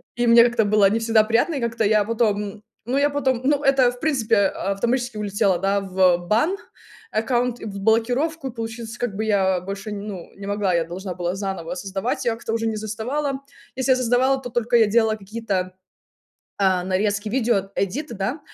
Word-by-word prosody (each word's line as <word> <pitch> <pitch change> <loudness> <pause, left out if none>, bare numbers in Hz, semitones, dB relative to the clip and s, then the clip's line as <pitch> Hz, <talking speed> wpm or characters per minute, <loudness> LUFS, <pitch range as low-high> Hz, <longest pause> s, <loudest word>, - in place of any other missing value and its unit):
И 240 0 0
мне 235 0 +8
как-то 235 -2 +2
было 205 -1 +4
не 220 +3 0
всегда 225 -1 +3
приятно, 235 +9 +1
и - - -1
как-то 230 -1 -1
я 210 0 +4
потом, 215 -1 0
м 205 +1 -8 0.2
Ну, 250 +4 -1
я 285 +1 +3
потом, 265 -4 0
ну, 285 0 +2
это, 270 -3 +4
в 245 - -13
принципе, 255 -8 +1
а, 195 - -3
автоматически 240 +3 -1
улетело, 200 -3 +1
да, 195 +2 +1
в 185 -2 +3
бан, 220 - +1 0.5
аккаунт 240 +2 0
и - - -6
в 200 -2 -6
блокировку, 250 +7 +1
получается, 225 0 -6
как 235 -5 -2
бы 220 - -2
я 190 -4 +2
больше, 195 +3 -6
ну, 200 -3 -7
не 200 - -9
могла. 200 -2 0
Я 170 -1 +1
должна 180 +2 -6
была 175 0 -2
заново 190 -4 -4
создавать. 195 +7 -3
Я 235 - +2
как-то 225 0 -5
уже 225 0 -1
не 220 -1 -2
создавала. 250 +7 -3 0.4
Если 260 +1 +2
создавала, 255 +2 +2
то 250 - -6
только 240 0 0
я 225 - +6
делала 220 0 +2
какие-то, 195 -3 -3 0.9
а, 190 -2 +2
нарезки, 200 +3 0
видеоэдиты, 225 +2 -1
да. 210 +9 -3
220 Hz, 190 wpm, -22 LUFS, 195-245 Hz, 0.9 s, мне